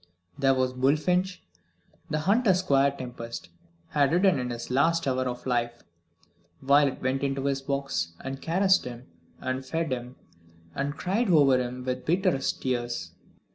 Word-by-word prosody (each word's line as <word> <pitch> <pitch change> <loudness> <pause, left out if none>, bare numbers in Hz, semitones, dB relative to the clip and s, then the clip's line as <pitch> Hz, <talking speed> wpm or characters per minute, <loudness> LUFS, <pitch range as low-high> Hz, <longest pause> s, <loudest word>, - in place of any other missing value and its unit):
There 135 -2 +3
was 130 -1 0
Bullfinch, 155 +8 +1 0.7
the 155 0 -1
hunter 200 +3 +3
Squire 140 -7 +3
Tempest 120 -7 -7 0.4
had 145 -1 +2
ridden 180 -3 +3
in 125 0 -3
his 120 0 -6
last 165 +4 +2
hour 130 -1 0
of 125 0 -5
life. 120 -2 -1 0.8
Violet 140 0 +3
went 130 +1 0
into 135 -1 -1
his 135 -1 0
box, 135 - -2
and 135 0 -6
caressed 190 +3 +3
him, 125 0 -8 0.4
and 130 +1 -2
fed 160 +2 -2
him, 125 0 -4 0.6
and 145 +1 -3
cried 200 +5 0
over 145 -6 +5
him 125 0 -4
with 125 0 -2
bitterest 160 -5 +1
tears. 120 -2 -2
135 Hz, 145 wpm, -27 LUFS, 125-160 Hz, 0.8 s, over